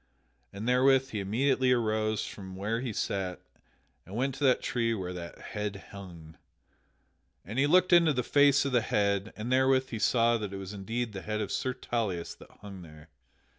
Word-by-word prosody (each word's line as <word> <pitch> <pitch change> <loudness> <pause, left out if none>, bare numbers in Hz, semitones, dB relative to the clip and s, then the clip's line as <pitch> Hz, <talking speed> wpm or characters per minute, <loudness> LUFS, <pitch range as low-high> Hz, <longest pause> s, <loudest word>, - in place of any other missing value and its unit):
and 105 +4 -6
therewith 130 +1 +4
he 105 - -3
immediately 130 +6 +1
arose 110 -3 +1
from 95 -2 -9
where 105 +4 -2
he 125 -3 -3
sat 95 -3 -3 0.6
and 95 - -10
went 130 +3 0
to 135 +3 -6
that 130 -2 +4
tree 115 -2 0
where 90 -3 -4
the 85 -1 -6
head 105 -2 -5
hung. 85 -5 -11 1.1
And 110 +7 -4
he 145 - +4
looked 180 +3 +4
into 170 -2 +6
the 125 -2 -1
face 140 +1 +4
of 140 - -1
the 120 -2 +3
head, 100 -1 0
and 110 +4 -4
therewith 130 0 +3
he 115 - -4
saw 115 +2 +3
that 105 -2 -5
it - - -4
was 95 +1 -7
indeed 110 +3 -3
the 95 - -6
head 105 +1 -3
of 105 - -3
Sir 130 -1 -1
Tauleas 100 -8 -3
that - - -14
hung 100 -2 -9
there. 75 -1 -14
110 Hz, 190 wpm, -29 LUFS, 100-130 Hz, 1.1 s, into